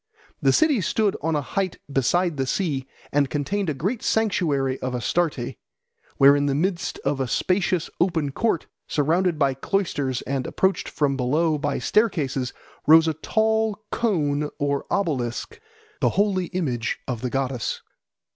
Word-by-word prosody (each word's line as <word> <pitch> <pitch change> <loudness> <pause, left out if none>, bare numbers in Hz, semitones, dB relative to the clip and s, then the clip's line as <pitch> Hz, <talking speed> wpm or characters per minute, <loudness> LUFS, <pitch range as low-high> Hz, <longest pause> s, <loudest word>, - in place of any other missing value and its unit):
The - - +4
city 310 -8 +3
stood 205 +3 +1
on 160 +1 0
a 145 - 0
height 185 +7 -2 0.2
beside 170 +5 +1
the 135 -1 -1
sea, 140 -4 -1 0.2
and 140 -1 +2
contained 175 +8 -1
a 150 - -1
great 200 - -2
sanctuary 150 -12 +1
of 130 -1 -2
Astarte, 125 0 -1 0.6
where 140 +1 +7
in 145 0 +1
the 140 - +1
midst 175 +3 -1
of 140 - 0
a 130 - 0
spacious 180 - +1
open 165 -5 +1
court, 220 +1 0 0.2
surrounded 165 +3 +1
by 140 -3 +2
cloisters 140 -5 -1
and 135 -2 -2
approached 190 0 0
from 140 -2 0
below 150 +5 +1
by 145 0 -1
staircases, 145 - +1 0.4
rose 160 +1 +7
a 160 - +1
tall 220 +5 0
cone 150 -10 0
or 140 -1 -1
obelisk, 150 - -2 0.4
the - - +3
holy 195 -3 +1
image 130 -11 -2
of 120 -3 -3
the 125 - -2
goddess. 130 -2 -2
155 Hz, 150 wpm, -24 LUFS, 135-190 Hz, 0.6 s, where